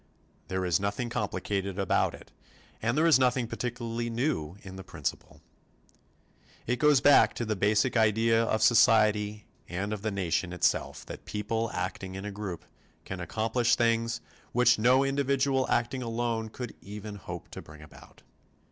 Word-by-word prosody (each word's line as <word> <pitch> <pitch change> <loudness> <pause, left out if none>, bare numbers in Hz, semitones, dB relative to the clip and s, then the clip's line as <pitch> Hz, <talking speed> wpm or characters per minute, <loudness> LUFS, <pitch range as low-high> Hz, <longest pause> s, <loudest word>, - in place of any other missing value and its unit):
There 95 0 -2
is 85 -3 +2
nothing 100 +5 -2
complicated 100 -3 -2
about 95 -2 +1
it - - -16 0.5
and 115 +5 0
there 160 - +3
is 160 -5 +6
nothing 125 -1 +2
particularly 120 0 -4
new 115 - -2
in 95 -1 -9
the 95 - -8
principle. 75 -6 -6 1.2
It 125 +1 -1
goes 150 -3 +5
back 145 0 +6
to 120 - -3
the 110 -1 -1
basic 105 +6 +2
idea 115 +1 +3
of 110 -1 0
society 105 -2 +4 0.2
and 95 +5 -3
of 105 - -5
the 110 - -1
nation 90 -3 -1
itself 90 - 0
that - - -9
people 110 +2 -2
acting 95 +1 -4
in 95 +1 -6
a 105 - -4
group 100 -4 -6 0.4
can 95 - -6
accomplish 110 +6 +1
things 115 0 +1 0.3
which 120 -2 +4
no 125 +4 +4
individual 135 -1 +1
acting 125 +2 0
alone 115 -1 -2
could 120 +1 -7
even 105 +1 -8
hope 95 - -8
to - - -8
bring 75 0 -14
about. 75 - -16
110 Hz, 155 wpm, -28 LUFS, 100-120 Hz, 1.2 s, is